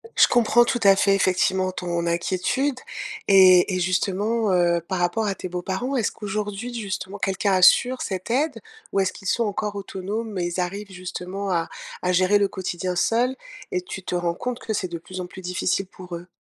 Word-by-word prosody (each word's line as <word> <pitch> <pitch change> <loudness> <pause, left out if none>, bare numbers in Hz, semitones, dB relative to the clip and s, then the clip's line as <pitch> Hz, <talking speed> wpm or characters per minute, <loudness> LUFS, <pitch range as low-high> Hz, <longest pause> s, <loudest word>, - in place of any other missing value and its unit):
Je - - +7
comprends, 240 0 +4
tout 240 0 -1
à 195 -1 +7
fait, 195 0 +3
effectivement, 185 0 +2
ton 175 -2 -3
inquiétude 185 +11 0 0.5
et 185 -1 +7
et 185 - 0
justement, 200 +4 0
heu, 175 -1 +3
par 190 -1 -2
rapport 175 +5 +1
à 200 - 0
tes 185 - -7
beaux-parents, 190 +9 -3
est-ce 230 -5 +1
qu'aujourd'hui, 210 +2 -4
justement, 200 -3 -5
quelqu'un 195 0 0
assure 245 +7 +5
cette 190 +2 -4
aide? 270 0 0 0.3
Ou 195 - +1
est-ce 190 -1 +2
qu'ils 195 -1 -10
sont 235 - +2
encore 205 0 -2
autonomes, 200 +2 -4
et 175 - 0
ils 175 +1 -3
arrivent, 195 +3 -3
justement, 185 +2 -5
à 165 -1 0 0.4
à 180 - +2
gérer 185 +3 +4
le 200 -1 +2
quotidien 180 -1 -3
seuls? 240 +7 +1 0.4
Et 365 -1 0
tu 195 - -8
te - - -5
rends 175 -1 0
compte 250 +3 -4
que 220 - -4
c'est 190 -3 -1
de 170 - -4
plus 185 +2 -9
en 180 - -3
plus 190 +1 -11
difficile 180 +1 -1
pour 180 -2 -9
eux? 175 +2 -9
190 Hz, 200 wpm, -24 LUFS, 180-215 Hz, 0.5 s, Je